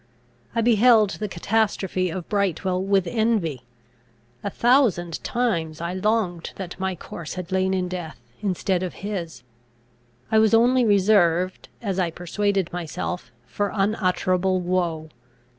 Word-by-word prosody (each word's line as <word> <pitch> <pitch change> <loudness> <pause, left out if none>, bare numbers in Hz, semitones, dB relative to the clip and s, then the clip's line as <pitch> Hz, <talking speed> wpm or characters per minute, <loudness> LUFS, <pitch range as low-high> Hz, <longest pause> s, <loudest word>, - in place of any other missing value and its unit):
I 230 - +2
beheld 225 -2 +5
the 210 - -4
catastrophe 190 -1 0
of 170 +1 -5
Brightwel 190 -2 0
with 195 -1 +2
envy. 215 - 0 0.8
A 200 - -1
thousand 215 - +2
times 170 -11 -1
I 170 +1 -3
longed 185 -3 -1
that 185 -2 -7
my 190 -1 -1
corse 165 -1 -8
had 180 0 -6
lain 190 0 +1
in 180 -1 -1
death, 175 -5 -6 0.2
instead 190 -2 0
of 185 -2 -4
his. 170 - -5 0.9
I 220 - +5
was 220 +1 +5
only 245 +2 +4
reserved, 190 -4 +3
as 195 -3 -1
I 175 -2 +1
persuaded 190 +2 -1
myself, 175 -4 -4
for 165 - -2
unutterable 185 -2 +1
woe. 175 -3 -1
185 Hz, 130 wpm, -24 LUFS, 175-210 Hz, 0.9 s, beheld